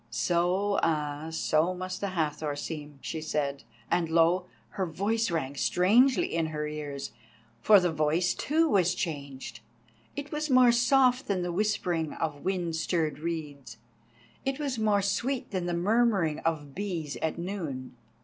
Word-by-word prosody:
"So, 175 - +1
ah, 150 -1 -1
so 160 +2 +1
must 185 +1 -5
the 200 - 0
Hathor 150 -2 -1
seem," 150 -1 -6
she 160 - -4
said, 145 -3 -2 0.3
and 170 -2 +1
lo! 170 +2 +3 0.2
her 190 -3 -2
voice 210 +7 0
rang 145 -5 -2
strangely 230 - +3
in 165 -1 +1
her 150 -1 -3
ears. 145 -2 -5 0.5
For 210 - +7
the 180 -2 +1
voice, 160 +3 +1
too, 320 +3 +1
was 185 - +3
changed, 140 -8 -5 0.6
it 285 0 -6
was 305 0 -2
more 255 -2 +6
soft 250 +2 +3
than 190 -3 0
the 175 - -2
whispering 175 -5 0
of 150 -3 -4
wind 180 -3 -1
stirred 160 -3 -1
reeds; 150 -7 -5 0.7
it 270 0 -1
was 280 -5 -2
more 210 -2 +2
sweet 245 +6 -1
than 185 -3 -2
the 175 - -1
murmuring 195 -4 +2
of 150 -4 -2
bees 175 -6 -4
at 160 +1 -2
noon. 165 -9 -5
170 Hz, 150 wpm, -28 LUFS, 150-205 Hz, 0.7 s, For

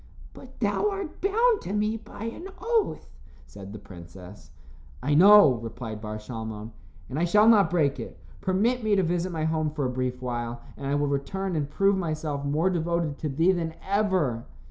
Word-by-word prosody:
"But - - -14
thou 420 - +1
art 390 -5 -6
bound 445 +4 +3
to 190 - -5
me 210 +1 0
by 225 -1 -9
an 230 +11 -6
oath," 460 -2 0 0.4
said 100 -1 -11
the 105 - -7
princess. 90 +1 -13 0.5
"I 145 - +1
know," 180 - +7
replied 115 -1 -7
Bar 105 0 -5
Shalmon, 110 -1 -7 0.4
"and 140 - -4
I - - +1
shall 210 +5 +4
not 210 -7 +6
break 155 -5 +1
it. - - -8 0.2
Permit 220 +6 +1
me 215 -1 +2
to 190 - +2
visit 175 +1 -1
my 160 -2 -3
home 160 -1 0
for 150 -2 -3
a 125 - -1
brief 125 0 -2
while, 120 -1 -4
and 140 - -6
I 140 - +1
will 145 0 +1
return 170 +7 -2
and 145 -2 -1
prove 195 +5 +2
myself 155 -5 -3
more 155 +6 +1
devoted 170 -3 -1
to 155 - -2
thee 165 +7 +3
than 165 -3 -2
ever." 190 - +1
160 Hz, 190 wpm, -26 LUFS, 125-200 Hz, 0.5 s, know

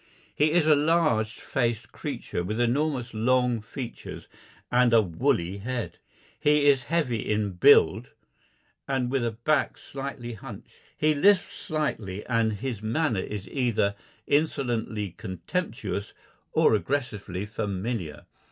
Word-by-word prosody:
He 150 +1 +3
is 175 -3 +4
a 155 - +6
large 150 -8 +2
faced 115 -1 -2
creature 85 - -4
with 105 +5 -3
enormous 125 0 0
long 125 +1 +2
features 120 +2 -8 0.4
and 125 -1 +4
a 115 - +7
woolly 95 - 0
head; 120 +2 -4 0.4
he 150 0 +3
is 135 -3 +4
heavy 130 -10 0
in 105 -1 0
build 90 -1 +5 0.8
and 130 -2 0
with 135 -3 +1
a 120 - +1
back 140 +7 0
slightly 135 -3 -6
hunched; 110 - -10 0.2
he 155 0 +3
lisps 190 +6 +3
slightly 115 - -3
and 115 -2 +1
his 115 0 -4
manner 115 0 0
is 105 0 -6
either 120 -7 +1 0.3
insolently 120 - 0
contemptuous 100 - -4 0.4
or - - +4
aggressively 105 -6 -2
familiar. 105 -5 -4
120 Hz, 125 wpm, -27 LUFS, 105-140 Hz, 0.8 s, a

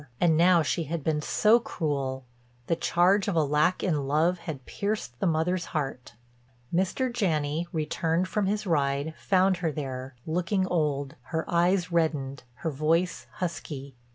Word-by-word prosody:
And 170 -2 +4
now 170 0 +5
she 165 +2 -1
had 160 0 -4
been 150 0 0
so 215 +8 +4
cruel; 135 - -3 0.4
the 165 - +1
charge 180 +4 +3
of 200 - 0
a 160 - +4
lack 150 +5 +2
in 150 -7 0
love 165 +5 +2
had 160 -6 -7
pierced 200 - -3
the - - +1
mother's 170 +2 +1
heart. 135 -6 -4 0.6
Mr. 195 +8 0
Janney, 160 -6 0
returned 165 +2 0
from 200 +1 0
his 210 +1 -1
ride, 145 -2 0
found 190 -1 +3
her 170 -3 -1
there, 130 -3 -5
looking 180 +4 0
old, 150 -6 -1
her 160 +3 -2
eyes 175 +1 +2
reddened, 150 -5 0 0.2
her 160 - +1
voice 160 +5 0
husky. 140 -6 -5
165 Hz, 155 wpm, -27 LUFS, 145-180 Hz, 0.6 s, now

